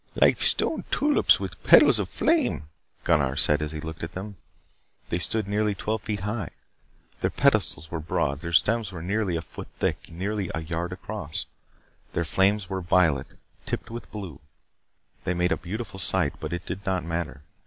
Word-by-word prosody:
"Like -, -, +4 dB
stone -, -, +2 dB
tulips 295 Hz, 0 st, +4 dB
with -, -, -6 dB
petals -, -, +7 dB
of -, -, -2 dB
flame," 315 Hz, -, +1 dB, 0.4 s
Gunnar 70 Hz, -6 st, +2 dB
said 75 Hz, +1 st, +4 dB
as 75 Hz, -1 st, -2 dB
he 80 Hz, -, -5 dB
looked 80 Hz, +1 st, -7 dB
at 80 Hz, -, -5 dB
them. 100 Hz, +2 st, -6 dB, 0.7 s
They 85 Hz, -, +1 dB
stood 110 Hz, +3 st, 0 dB
nearly 105 Hz, 0 st, +1 dB
twelve 110 Hz, +2 st, -2 dB
feet 105 Hz, -2 st, -3 dB
high. 105 Hz, -3 st, -3 dB, 0.7 s
Their -, -, +1 dB
pedestals 80 Hz, -, +2 dB
were 85 Hz, -, -2 dB
broad; 70 Hz, -2 st, -1 dB
their 85 Hz, +1 st, -5 dB
stems 110 Hz, +4 st, +3 dB
were 85 Hz, -3 st, -7 dB
nearly 100 Hz, -1 st, 0 dB
a 80 Hz, -, -2 dB
foot -, -, -9 dB
thick, -, -, -1 dB
nearly 95 Hz, +3 st, -2 dB
a 80 Hz, -, -2 dB
yard 85 Hz, +2 st, -3 dB
across. 90 Hz, -4 st, -5 dB, 0.7 s
Their 85 Hz, -, 0 dB
flames 95 Hz, +4 st, +2 dB
were 95 Hz, 0 st, -3 dB
violet, 85 Hz, -6 st, +3 dB, 0.4 s
tipped -, -, -3 dB
with 120 Hz, +1 st, -7 dB
blue. 95 Hz, -10 st, -7 dB, 0.8 s
They 90 Hz, -, -1 dB
made 90 Hz, +1 st, +1 dB
a -, -, +4 dB
beautiful 100 Hz, +1 st, -6 dB
sight, 90 Hz, -5 st, +2 dB
but -, -, -5 dB
it 85 Hz, 0 st, -4 dB
did 95 Hz, +2 st, -5 dB
not 95 Hz, -4 st, -1 dB
matter. 80 Hz, -5 st, -3 dB
90 Hz, 175 wpm, -26 LUFS, 80-105 Hz, 0.8 s, petals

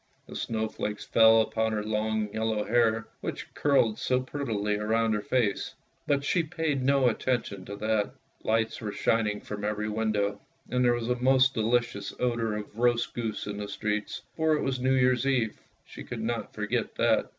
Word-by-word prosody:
The -, -, -10 dB
snowflakes 110 Hz, -2 st, -3 dB
fell 115 Hz, 0 st, +6 dB
upon 110 Hz, 0 st, 0 dB
her 105 Hz, -1 st, -1 dB
long 110 Hz, 0 st, -1 dB
yellow 110 Hz, -1 st, 0 dB
hair, 115 Hz, 0 st, +2 dB
which -, -, -6 dB
curled 135 Hz, -7 st, +2 dB
so 125 Hz, 0 st, +1 dB
prettily 115 Hz, -6 st, -2 dB
round 110 Hz, +1 st, +1 dB
her 105 Hz, -, 0 dB
face, 110 Hz, -3 st, 0 dB, 0.3 s
but 140 Hz, -1 st, +2 dB
she 170 Hz, +4 st, +2 dB
paid 155 Hz, -3 st, -2 dB
no 135 Hz, 0 st, +3 dB
attention 115 Hz, -5 st, -1 dB
to 100 Hz, -, -6 dB
that. 110 Hz, 0 st, 0 dB, 0.3 s
Lights 110 Hz, +1 st, 0 dB
were 105 Hz, -2 st, -3 dB
shining 105 Hz, -1 st, +1 dB
from 105 Hz, -1 st, -6 dB
every 105 Hz, 0 st, -1 dB
window, 105 Hz, -2 st, 0 dB, 0.3 s
and 125 Hz, 0 st, +2 dB
there 120 Hz, -1 st, +4 dB
was 120 Hz, -1 st, -3 dB
a -, -, +3 dB
most 130 Hz, +1 st, +5 dB
delicious 115 Hz, -2 st, 0 dB
odour 115 Hz, -3 st, 0 dB
of 105 Hz, 0 st, -7 dB
roast 120 Hz, -1 st, +2 dB
goose 115 Hz, -3 st, -3 dB
in 105 Hz, 0 st, -5 dB
the 105 Hz, 0 st, -4 dB
streets, 105 Hz, +1 st, -3 dB
for 160 Hz, -1 st, +2 dB
it -, -, -1 dB
was 135 Hz, -1 st, -1 dB
New 130 Hz, +1 st, +2 dB
Year's 130 Hz, 0 st, +3 dB
Eve 120 Hz, -6 st, 0 dB
— -, -, -40 dB
she -, -, -10 dB
could 120 Hz, -2 st, -6 dB
not 115 Hz, -2 st, -3 dB
forget 110 Hz, +2 st, -2 dB
that. -, -, +2 dB
110 Hz, 185 wpm, -28 LUFS, 105-125 Hz, 0.3 s, fell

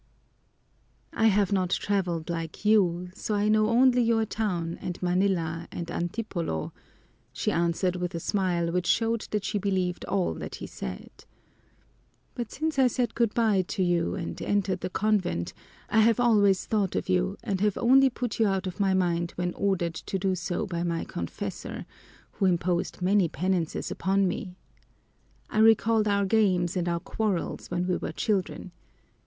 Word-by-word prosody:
"I 225 Hz, -, +3 dB
have 205 Hz, -2 st, +3 dB
not 185 Hz, -3 st, +1 dB
traveled 180 Hz, -5 st, -1 dB
like 165 Hz, +2 st, -5 dB
you, 180 Hz, -4 st, +3 dB
so 210 Hz, +2 st, -3 dB
I 205 Hz, +1 st, +1 dB
know 215 Hz, 0 st, +3 dB
only 250 Hz, +1 st, +4 dB
your 225 Hz, -1 st, +2 dB
town 180 Hz, -7 st, -2 dB
and 175 Hz, -, -5 dB
Manila 175 Hz, -3 st, 0 dB
and 170 Hz, -1 st, -5 dB
Antipolo," 175 Hz, -, -3 dB, 0.6 s
she -, -, -1 dB
answered 170 Hz, +2 st, 0 dB
with 180 Hz, -1 st, -3 dB
a -, -, -2 dB
smile 175 Hz, -3 st, 0 dB
which 180 Hz, 0 st, -1 dB
showed 230 Hz, -1 st, +1 dB
that 210 Hz, -2 st, -2 dB
she 210 Hz, -, -1 dB
believed 185 Hz, -3 st, -1 dB
all 195 Hz, -2 st, -1 dB, 0.2 s
he -, -, -7 dB
said. -, -, -7 dB, 1.2 s
"But 240 Hz, -4 st, -5 dB
since 310 Hz, -1 st, -2 dB
I 260 Hz, -, +6 dB
said 245 Hz, 0 st, -1 dB
good 235 Hz, -3 st, 0 dB
by 220 Hz, -5 st, +3 dB
to 185 Hz, +2 st, -2 dB
you 175 Hz, -1 st, +1 dB
and 175 Hz, -4 st, -5 dB
entered 195 Hz, -2 st, 0 dB
the 185 Hz, -, -4 dB
convent, 185 Hz, -, 0 dB, 0.3 s
I 220 Hz, -, +2 dB
have 225 Hz, +1 st, +4 dB
always 205 Hz, -5 st, +4 dB
thought 205 Hz, -4 st, 0 dB
of -, -, -2 dB
you 185 Hz, +1 st, +1 dB
and 200 Hz, -5 st, -2 dB
have 210 Hz, -2 st, +1 dB
only 265 Hz, +3 st, +5 dB
put 245 Hz, -2 st, -4 dB
you 220 Hz, -, +4 dB
out 195 Hz, -1 st, 0 dB
of 185 Hz, 0 st, -6 dB
my 195 Hz, -1 st, +2 dB
mind 175 Hz, -2 st, 0 dB
when 180 Hz, 0 st, -2 dB
ordered 185 Hz, -4 st, 0 dB
to 195 Hz, -, -4 dB
do 190 Hz, 0 st, 0 dB
so 180 Hz, +3 st, -2 dB
by 175 Hz, -4 st, -3 dB
my 170 Hz, -1 st, -1 dB
confessor, 85 Hz, -, -6 dB, 0.5 s
who 195 Hz, -, -1 dB
imposed 175 Hz, 0 st, 0 dB
many 190 Hz, -2 st, +3 dB
penances 170 Hz, +1 st, -1 dB
upon 195 Hz, 0 st, +1 dB
me. 180 Hz, 0 st, -4 dB, 1.0 s
I 215 Hz, -, 0 dB
recalled 225 Hz, 0 st, +4 dB
our 200 Hz, -1 st, +2 dB
games 190 Hz, -4 st, +2 dB
and 175 Hz, -1 st, 0 dB
our 170 Hz, 0 st, 0 dB
quarrels 200 Hz, 0 st, -2 dB
when 175 Hz, 0 st, -1 dB
we 180 Hz, -1 st, 0 dB
were -, -, -4 dB
children. 190 Hz, 0 st, -2 dB
190 Hz, 165 wpm, -27 LUFS, 175-215 Hz, 1.2 s, I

